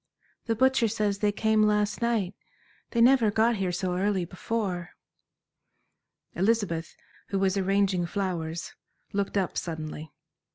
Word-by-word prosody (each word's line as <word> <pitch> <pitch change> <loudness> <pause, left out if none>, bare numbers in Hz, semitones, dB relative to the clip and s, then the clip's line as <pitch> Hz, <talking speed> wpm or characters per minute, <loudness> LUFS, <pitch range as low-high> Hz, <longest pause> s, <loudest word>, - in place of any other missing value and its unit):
"The 225 - +1
butcher 260 0 +3
says 210 -2 -1
they 210 0 +2
came 220 +1 +2
last 210 +1 +2
night. 225 -5 0 0.6
They 235 - +1
never 245 -2 +6
got 220 +2 +2
here 190 -2 -1
so 180 0 -2
early 190 -1 +1
before." 185 -1 -3 1.4
Elizabeth, 190 -4 0 0.3
who 195 - -2
was 190 0 +2
arranging 195 -2 +1
flowers, 170 -4 -3 0.4
looked 200 0 -1
up 190 -2 0
suddenly. 155 -2 -6
200 Hz, 125 wpm, -27 LUFS, 180-220 Hz, 1.4 s, never